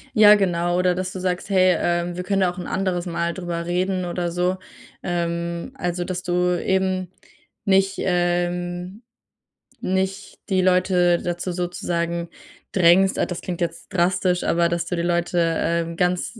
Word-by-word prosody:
Ja, 210 -1 +8
genau. 175 -3 +1
Oder 180 -1 +2
dass 185 0 -3
du 185 - -6
sagst: 180 +1 -2
„Hey, 185 -2 +4
ähm, 175 0 0
wir 180 - -4
können 195 +1 0
da 185 - +3
auch 180 - -14
'n 180 - -5
anderes 185 -2 -1
Mal 170 -1 -2
drüber 175 -2 -4
reden“, 185 +1 -1
oder 175 0 -2
so. 180 +2 0 0.5
Ähm, 170 +3 -2
also, 175 -7 -2
dass 180 0 -4
du 180 0 +1
eben 185 -1 0 0.5
nicht, 195 0 +3
ähm 175 +2 -1 0.8
nicht 190 -1 -2
die 190 -1 +2
Leute 180 -1 +3
dazu 175 +1 -3
sozusagen 170 -1 -2 0.4
drängst. 185 +1 +4
Ah, - - +1
das 175 - -5
klingt 175 -2 -5
jetzt 170 -1 -3
drastisch, 180 0 +1
aber 170 0 +2
dass 170 0 -2
du 180 - -2
die 170 - -2
Leute, 175 0 0 0.2
ähm, 170 0 -1
ganz 180 +5 -1
180 Hz, 160 wpm, -22 LUFS, 175-185 Hz, 0.8 s, Ja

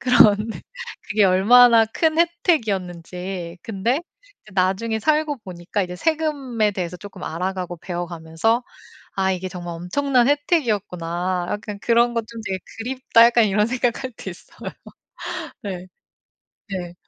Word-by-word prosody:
그런 220 -5 +6 0.7
그게 210 0 +2
얼마나 225 +5 +7
큰 315 +8 0
혜택이었는지. 190 - -1
근데 230 +7 0 0.4
이제 215 - -17
나중에 195 +4 +1
살고 305 +2 +1
보니까 180 +2 -3
이제 180 -1 -5
세금에 275 - 0
대해서 180 -2 -4
쪼끔 195 -1 -11
알아가고 180 +1 -3
배워가면서 175 +6 -1 0.5
'아 190 -1 +2
이게 185 0 -3
정말 175 -2 -6
엄청난 250 +8 +1
혜택이었구나. 185 - 0
약간 205 0 -4
그런 235 +1 +3
거 230 - 0
좀 225 +1 -10
되게 190 -3 -2 0.4
그립다.' 230 -3 +6
약간 235 -1 +4
이런 210 +1 +2
생각 245 0 0
할 260 - -3
때 195 - -7
있어요. 175 - -19 1.1
예. 185 -2 -5 0.9
네. 175 -2 -4
205 Hz, 290 characters per minute, -22 LUFS, 180-240 Hz, 1.1 s, 얼마나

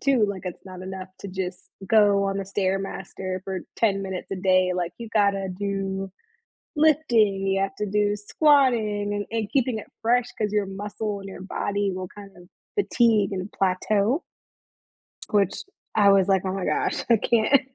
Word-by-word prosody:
too. 265 -6 +3
Like 195 -2 -5
it's 180 +1 -7
not 185 -1 -9
enough 190 0 -6
to 200 - -6
just 185 -1 -4 0.3
go 205 -1 +4
on 195 0 -1
the 195 - -3
Stairmaster 190 -1 -3
for 190 -2 -3 0.2
10 195 -3 +2
minutes 190 -1 -5
a 195 - -2
day. 185 0 +3
Like 175 -1 -2
you 230 -1 -7
gotta 200 -2 +2
do 195 -1 -2 0.7
lifting, 240 -11 +3
you 195 0 +1
have 195 0 -2
to 210 - -1
do 205 0 +2
squatting 220 -4 +2
and 205 0 -2
and 220 -3 -2
keeping 255 -4 +1
it - - -10
fresh 240 +2 +3
'cause 210 -2 -1
your 205 -1 +2
muscle 205 +1 -4
in 195 - -9
your 190 - -9
body 200 +1 -1
will 185 0 -5
kind 200 -1 -12
of 180 - -14 0.3
fatigue 225 - +3
and 185 +2 -4
plateau 200 - +1 1.1
which 200 -2 +2 0.4
I 205 -2 +6
was 195 -1 +5
like, 190 -1 +3
oh 185 - -1
my 195 -1 -3
gosh, - - 0
I 230 - +6
can't 235 +5 +3
200 Hz, 175 wpm, -25 LUFS, 190-215 Hz, 1.1 s, I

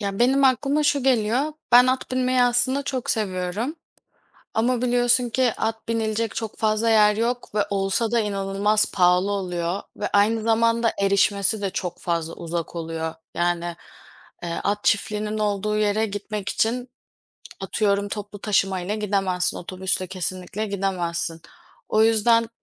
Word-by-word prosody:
Ya, 200 -1 -3
benim 265 +3 +4
aklıma 275 +3 +2
şu 285 -2 +2
geliyor: 255 +3 +1 0.2
Ben 245 +1 +8
at 255 0 -1
binmeyi 255 0 +2
aslında 245 +3 +2
çok 255 -2 -3
seviyorum 205 - -2 0.8
ama 240 +2 +1
biliyorsun 245 0 +2
ki 250 -1 +2
at 220 0 -3
binilecek 225 -1 -1
çok 225 -2 -5
fazla 220 +1 +1
yer 210 -1 +5
yok 235 0 -2
ve 205 -1 +1
olsa 195 +3 0
da 235 -1 +2
inanılmaz 205 +1 +1
pahalı 180 +1 +3
oluyor 180 -1 -2
ve 205 - -3
aynı 215 +2 +3
zamanda 230 +1 +2
erişmesi 200 +1 +2
de 195 - -1
çok 180 -2 -4
fazla 165 -1 -2
uzak 170 0 -5
oluyor. 160 -1 -4 0.2
Yani, 175 0 -1 0.7
eee, 170 -1 -3
at 205 +1 -1
çiftliğinin 210 +1 0
olduğu 210 0 0
yere 215 +1 +1
gitmek 205 0 -5
için 245 +3 -1 0.7
atıyorum 200 -1 0
toplu 205 0 -6
taşımayla 195 -2 0
gidemezsin, 195 -4 0
otobüsle 185 +1 -2
kesinlikle 185 +3 -4
gidemezsin. 175 -4 -2 0.5
O 215 - +3
yüzden 225 +1 +3
210 Hz, 140 wpm, -23 LUFS, 190-230 Hz, 0.8 s, Ben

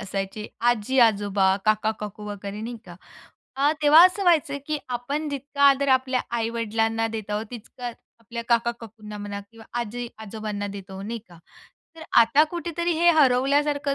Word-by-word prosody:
असायचे, 195 +2 -4 0.2
आजी-आजोबा, 205 -5 +2
काका-काकू 215 -1 -1
वगैरे 205 0 -6
नाही 235 +2 -5
का. 175 - -11 0.6
अ, 285 +2 +3
तेव्हा 305 +4 +8
असं 370 +2 -3
व्हायचं 315 -6 +3
की 305 -1 -1
आपण 275 +5 -3
जितका 280 0 -4
आदर 275 0 +2
आपल्या 260 -1 +2 0.2
आई-वडिलांना 225 0 -1
देत 215 -2 -6
आहोत, 210 +2 -2
तितका 245 +1 -9 0.3
आपल्या 235 +1 -7
काका-काकूंना 230 -3 -2
म्हणा 205 0 -5
किंवा 225 -1 -15 0.2
आजी-आजोबांना 220 -3 -5
देत 200 -1 -8
आहोत 190 +1 -7
नाही 230 +2 -4
का? 175 -1 -16 0.6
तर 320 - -10 0.2
आता 275 +7 +5
कुठेतरी 345 0 -2
हे 345 0 +6
हरवल्यासारखं 280 +2 +2
230 Hz, 140 wpm, -24 LUFS, 210-280 Hz, 0.6 s, तेव्हा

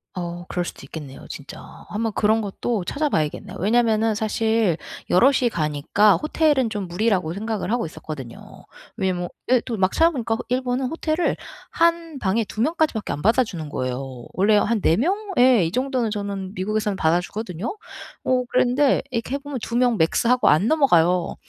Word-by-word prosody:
어 175 -1 -5
그럴 180 - -2
수도 - - -8
있겠네요, 140 -1 -9
진짜. - - -9 0.3
한번 220 +1 -2
그런 220 +2 +2
것도 210 +1 -2
찾아 300 0 -1
봐야겠네요. 155 - -2
왜냐면은 225 +1 +2
사실 220 -3 +1 0.3
여럿이 250 +5 +4
가니까 160 +6 +2
호텔은 300 -5 +1
좀 205 -4 -4
무리라고 180 -3 0
생각을 215 +2 -3
하고 240 -6 0
있었거든요. 140 -6 -9 0.3
왜냐하면 180 -2 -1 0.2
예 255 - +6
또 235 - -3
막 190 -1 +2
찾아 330 +1 +4
보니까 230 -5 -2
일본은 255 +1 0
호텔을 320 +2 -1 0.4
1 335 -3 +1
방에 215 +2 +1
2 215 - -5
명까지밖에 310 -6 0
안 145 - -4
받아 230 +5 +4
주는 165 -9 -7
거예요. 130 -2 -4
원래 205 +3 +3
한 215 +1 +1
4 165 0 +3
명 345 - +2 0.2
예 245 -7 +5
이 165 - -2
정도는 255 -2 -1
저는 200 -2 -4
미국에서는 210 +2 -1
받아 165 -1 +2
주거든요. 200 - -5 0.5
어 255 -1 +2
그랬는데 255 +3 +3
이렇게 250 +2 -2
해 - - 0
보면 285 -1 -6
2 235 - -4
명 245 -2 +3
맥스 165 +8 +2
하고 250 +1 +3
안 155 +8 +4
넘어가요. 180 - +3
220 Hz, 365 characters per minute, -23 LUFS, 180-250 Hz, 0.5 s, 예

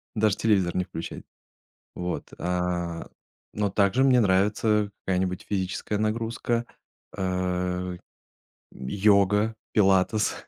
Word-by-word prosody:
даже 110 -1 +2
телевизор 95 -6 +2
не 90 - +1
включать. 80 - -7 0.7
Вот, 90 0 -3
а, 90 -1 -2 0.5
но 105 -1 0
также 100 +6 +2
мне 130 -2 +5
нравится 105 +1 +2
какая-нибудь 90 -1 -1
физическая 100 +1 -2
нагрузка, 115 +2 -1 0.5
э, 90 -1 -2 0.8
йога, 100 +7 +2 0.2
пилатес, 100 +1 +3
95 Hz, 90 wpm, -26 LUFS, 90-105 Hz, 0.8 s, мне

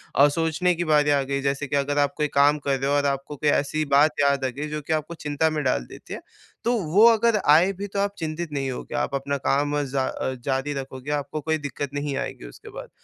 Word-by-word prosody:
अ, 140 - +7
सोचने 165 +4 +1
की 175 - -2
बारी 150 -1 +3
आ 140 -1 +3
गई। 140 +1 -2
जैसे 140 +1 -1
की 145 - -2
अगर 145 +1 0
आप 145 - +2
कोई 150 - +1
काम 145 +1 +4
कर 140 -1 0
रहे 135 - -1
हो 145 - +2
और 145 - +1
आपको 140 +1 -2
कोई 145 +1 0
ऐसी 155 +2 +1
बात 150 +1 +4
याद 140 -1 +2
आ - - +1
गई, 145 +5 -5
जो 150 0 -4
कि 160 +3 -2
आपको 155 +2 -2
चिंता 150 0 -1
में 155 -1 -2
डाल 125 - 0
देती - - -11
है। - - -6 0.4
तो 240 - +1 0.2
वो 215 +4 +7
अगर 230 -1 +4
आए 170 +6 +6
भी 200 +2 -6
तो 200 - -1
आप 200 0 0
चिंतित 160 0 -4
नहीं 135 -2 -2
होगे, - - -6
आप - - -1
अपना 140 +1 -2
काम 145 +2 0
जा 135 -1 -1
अ, 130 - -3
जारी 135 +2 -1
रखोगे, 135 +1 -6
आपको 150 +1 -3
कोई 160 +2 0
दिक्कत 145 -1 -5
नहीं 145 -1 -2
आएगी - - -5
उसके - - -12
बाद। - - -9
145 Hz, 255 wpm, -24 LUFS, 140-155 Hz, 0.4 s, अ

